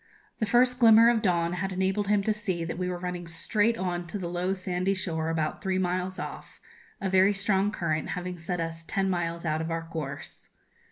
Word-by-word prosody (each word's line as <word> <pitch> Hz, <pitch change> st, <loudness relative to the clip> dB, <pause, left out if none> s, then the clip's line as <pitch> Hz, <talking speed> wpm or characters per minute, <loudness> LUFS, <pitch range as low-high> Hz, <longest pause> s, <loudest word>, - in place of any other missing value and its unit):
The 220 Hz, -, 0 dB
first 250 Hz, +3 st, +3 dB
glimmer 230 Hz, 0 st, +8 dB
of 230 Hz, -2 st, +1 dB
dawn 170 Hz, -3 st, +1 dB
had 190 Hz, +2 st, -2 dB
enabled 190 Hz, +2 st, 0 dB
him 205 Hz, -1 st, +2 dB
to 215 Hz, -, +1 dB
see 190 Hz, -5 st, -2 dB
that 165 Hz, +1 st, -5 dB
we 180 Hz, 0 st, -1 dB
were 180 Hz, -, -3 dB
running 175 Hz, -1 st, -5 dB
straight 210 Hz, +7 st, +2 dB
on 175 Hz, -3 st, -2 dB
to 190 Hz, -, -4 dB
the 180 Hz, -3 st, -4 dB
low 180 Hz, +2 st, -1 dB
sandy 185 Hz, +1 st, -1 dB
shore, 160 Hz, -4 st, -2 dB
about 155 Hz, -2 st, -1 dB
three 190 Hz, -1 st, 0 dB
miles 185 Hz, +1 st, -1 dB
off, -, -, -7 dB, 0.4 s
a 195 Hz, -, -2 dB
very 190 Hz, +2 st, +4 dB
strong 200 Hz, 0 st, +2 dB
current 155 Hz, -6 st, -2 dB
having 180 Hz, 0 st, -5 dB
set 175 Hz, +2 st, -3 dB
us 165 Hz, 0 st, -4 dB
ten 195 Hz, +3 st, 0 dB
miles 170 Hz, -1 st, -2 dB
out 155 Hz, 0 st, 0 dB
of 160 Hz, -, -3 dB
our 165 Hz, 0 st, -2 dB
course. 160 Hz, -4 st, -7 dB
180 Hz, 210 wpm, -28 LUFS, 170-195 Hz, 0.4 s, glimmer